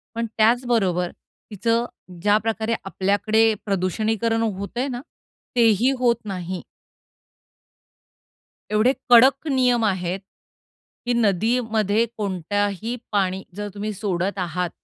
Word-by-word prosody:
पण 230 0 -1
त्याच 235 +3 +3
बरोबर 180 -7 +1 0.4
तिचं 230 +3 0 0.4
ज्या 205 +1 +4
प्रकारे 220 +1 -1
आपल्याकडे 215 +3 +2
प्रदूषणीकरण 215 +4 0 0.2
होतंय 240 +7 -3
ना, 245 -2 -4 0.5
तेही 230 +2 +4
होत 240 -2 +3
नाही. 185 -2 -5 2.1
एवढे 220 +5 +3 0.2
कडक 265 +5 +6
नियम 250 -4 +2
आहेत, 185 -1 -1 0.9
की 245 - +1
नदीमध्ये 220 0 +1
कोणत्याही 205 +3 -2 0.2
पाणी 190 -2 0
जर 205 0 -4
तुम्ही 210 +1 -3
सोडत 195 0 -2
आहात 180 0 -2
215 Hz, 100 wpm, -23 LUFS, 195-235 Hz, 2.1 s, कडक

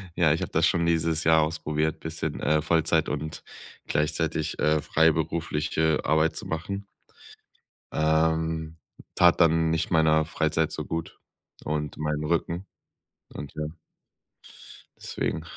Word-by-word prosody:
Ja, 80 -4 +4
ich 80 - -2
habe - - -4
das - - +3
schon 85 -1 +1
dieses 80 -1 +1
Jahr 80 0 +5
ausprobiert 75 0 -1
bisschen, 80 -1 -4
äh, 75 0 +2
Vollzeit 80 0 +2
und 80 0 -4 0.4
gleichzeitig, 75 0 -1
äh, 75 0 +2
freiberufliche 80 0 +1
Arbeit 80 +2 +2
zu - - -7
machen. 100 +5 -4 1.1
Ähm, 80 +1 +1 0.4
tat 85 -1 +5
dann 80 -1 +4
nicht 80 -1 -1
meiner 80 -1 +4
Freizeit 80 0 0
so - - -5
gut, 80 -1 -5 0.4
und 75 -1 -3
meinem 75 0 -2
Rücken 85 +3 -1 0.7
und 70 -2 -7
ja 75 - -3 1.3
deswegen 80 - -3
80 Hz, 125 wpm, -26 LUFS, 75-80 Hz, 1.3 s, Jahr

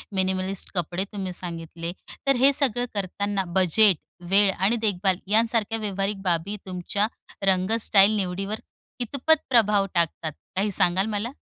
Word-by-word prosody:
Minimalist 190 0 -1
कपडे 175 +1 -2
तुम्ही 190 -3 -4
सांगितले, 170 -1 -5 0.4
तर 275 - +4
हे 265 +3 +5
सगळं 245 -4 +1
करताना 200 0 -2 0.2
बजेट, 190 0 +5 0.3
वेळ 200 +1 +5
आणि 195 +5 +1
देखभाल 195 -4 0
यांसारख्या 225 0 +2
व्यावहारिक 195 -1 -2
बाबी 180 +2 -1
तुमच्या 190 +3 -1 0.4
रंग-स्टाईल 200 +2 +4
निवडीवर 195 +2 -2 0.4
कितपत 280 +6 +2
प्रभाव 210 -5 +4
टाकतात? 165 -2 -1 0.2
काही 200 +2 0
सांगाल 185 +2 +2
मला? 210 +2 -2
195 Hz, 125 wpm, -24 LUFS, 185-215 Hz, 0.4 s, हे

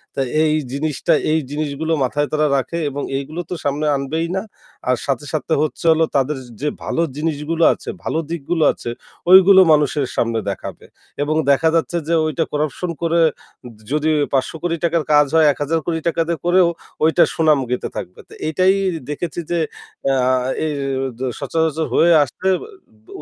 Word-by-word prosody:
তা - - -1 0.2
এই 155 -1 +2 0.2
জিনিসটা 145 +1 0 0.2
এই 160 - +3
জিনিসগুলো 155 +2 -2
মাথায় 145 +3 0
তারা 155 0 +2
রাখে 165 +6 -3
এবং 140 +1 -5 0.2
এইগুলো 155 +5 -5
তো - - -3
সামনে 145 +2 -1
আনবেই 155 +5 -2
না। 190 - 0 0.5
আর 125 - +4
সাথে, 140 0 -2
সাথে 155 +1 -1
হচ্ছে 155 +2 -3
হলো 160 0 +3
তাদের 140 +1 +1 0.2
যে 150 - -1 0.2
ভালো 165 - -1 0.2
জিনিসগুলো 160 +1 -1
আছে, - - -9
ভালো 160 - -1
দিকগুলো 165 0 -1
আছে, 120 - -7 0.4
ওইগুলো 190 0 +8
মানুষের 145 -1 +1
সামনে 115 -1 0
দেখাবে। 100 - -7 0.4
এবং 155 +1 -1 0.2
দেখা 160 +4 +3
যাচ্ছে 170 +1 0
যে 170 - 0
ওইটা 155 +1 0
corruption 155 +4 -2
করে 170 0 +1
য 150 - -2 0.6
যদি 155 +1 +1 0.2
৳৫,০০,০০,০০,০০০ 170 +4 0
র - - -6
কাজ 150 0 +6
হয়, 160 -1 +6
৳১০,০০,০০,০০,০০০ 165 +3 -1
দিয়ে 170 -3 -2
করেও 175 0 +4 0.4
ওইটার 160 +2 +4
সুনাম 155 -3 +3
গাইতে 125 - -1
থাকবে। 90 - -7
তো - - -15
এইটাই 185 +4 +3 0.4
দেখেছি 170 +3 -4
যে 170 - +1 0.5
অ্যা 135 0 +2
আ 130 - +3 0.3
এ - - 0 0.5
জ - - -10 0.2
সচরাচর 160 -1 -1
হয়ে 170 +1 +4
আসতে 145 +8 -5
অ - - -10 0.5
ব - - -34
155 Hz, 165 wpm, -19 LUFS, 145-165 Hz, 0.6 s, ওইগুলো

